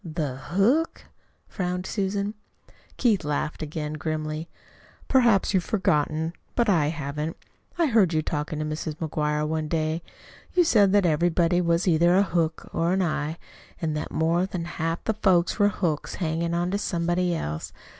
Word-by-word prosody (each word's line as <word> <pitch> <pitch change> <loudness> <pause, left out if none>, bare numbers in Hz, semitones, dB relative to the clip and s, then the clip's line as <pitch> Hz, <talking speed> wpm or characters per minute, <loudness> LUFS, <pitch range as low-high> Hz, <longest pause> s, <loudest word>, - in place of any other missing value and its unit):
"The 155 -5 -3
hook?" 205 - +1 0.4
frowned 180 -2 -3
Susan. 200 +1 -1 0.6
Keith 220 -9 +2
laughed 150 +1 -2
again 150 0 -4
grimly. 155 +1 -3 0.6
"Perhaps 235 -7 +4
you've 185 -2 +2
forgotten 160 -5 0 0.2
but 235 -1 +2
I 165 -8 +3
haven't. 150 +1 -3 0.4
I 340 - +3
heard 220 - +4
you 155 -2 +1
talking 150 0 -3
to 155 - -2
Mrs. 155 0 -4
McGuire 150 -1 -1
one 155 0 -1
day. 160 +1 -1 0.5
You 360 - +6
said 210 - +4
that 205 -2 +4
everybody 175 +2 +2
was 170 +1 +1
either 170 +1 +4
a 195 - +5
hook 165 -4 -1
or 170 +2 +1
an 190 0 +2
eye, 155 -1 -2 0.4
and 155 -2 -1
that 150 - -3
more 170 +3 +1
than 180 -3 -4
half 165 -1 -3
the 220 - 0
folks 190 -3 +2
were 205 0 +5
hooks 165 -7 -2
hanging 170 0 -1
on 175 +1 0
to 200 - 0
somebody 175 -1 0
else. 75 - -4
170 Hz, 160 wpm, -25 LUFS, 155-190 Hz, 0.6 s, You